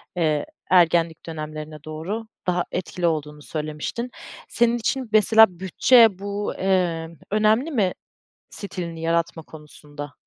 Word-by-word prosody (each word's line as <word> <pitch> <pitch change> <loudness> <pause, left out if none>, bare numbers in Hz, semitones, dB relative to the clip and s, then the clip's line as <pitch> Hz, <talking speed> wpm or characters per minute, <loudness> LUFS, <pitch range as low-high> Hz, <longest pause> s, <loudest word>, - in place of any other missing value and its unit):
eee, 155 -4 +1 0.2
ergenlik 170 -2 +3
dönemlerine 155 -1 -7
doğru 175 +9 -5 0.2
daha 180 -1 +1
etkili" 180 -1 -2
olduğunu 150 -2 -2
söylemiştin. 155 +11 -4 0.4
Senin 235 0 +2
için 250 +1 -2
mesela 215 -3 +5
bütçe 205 +2 +5
bu, 200 +1 -3
emm, 170 -3 0 0.2
önemli 215 +8 +2
mi 205 - +1 0.6
stilini 170 -5 -6
yaratma 165 0 -1
konusunda? 150 -2 -11
175 Hz, 110 wpm, -23 LUFS, 155-210 Hz, 0.6 s, mesela